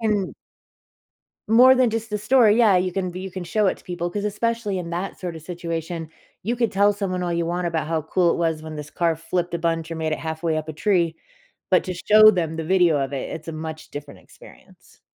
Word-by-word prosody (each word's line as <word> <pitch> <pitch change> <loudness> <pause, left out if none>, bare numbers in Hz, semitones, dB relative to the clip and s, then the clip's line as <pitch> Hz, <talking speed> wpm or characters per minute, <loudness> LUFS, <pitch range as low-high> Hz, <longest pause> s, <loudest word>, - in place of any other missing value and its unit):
and 210 -4 0 1.1
More 250 +4 +7
than 255 -3 +3
just 225 -1 -4
a 210 - 0
story. 220 0 +4
Yeah, 210 -5 +5
you 180 0 0
can 185 -1 -2
be 180 +1 -7
you 190 0 -6
can 185 -1 -6
show 210 +4 +1
it - - +1
to - - -21
people, 175 -1 -4
'cause 205 +2 -3
especially 210 -1 -1
in 170 -1 -5
that 180 +3 -4
sort 175 -3 -5
of 160 - -10
situation, 170 -1 -5 0.3
you 230 +5 -1
could 235 -3 +1
tell 200 +1 +3
someone 185 -3 -3
all 175 -1 -1
you 170 0 -1
want 175 +1 -2
about 160 -2 -2
how 160 -2 0
cool 170 +2 +2
it - - -2
was 160 -2 -1
when 155 -1 -7
this 150 0 -8
car 170 -2 0
flipped 170 +1 -3
a - - -1
bunch, 165 0 -1
or 165 - -4
made 160 -1 -2
it - - -1
halfway 160 0 -2
up 155 0 -4
a - - -4
tree, 170 -1 +1 0.5
but - - +4
to 185 -2 -4
show 215 +4 +7
them 165 -4 -2
the 160 - -3
video 175 -4 +3
of 135 0 -2
it, 135 - -4
it's 160 0 -7
a - - -3
much 155 0 -7
different 145 0 -9
experience. - - -19
175 Hz, 240 wpm, -23 LUFS, 160-205 Hz, 1.1 s, More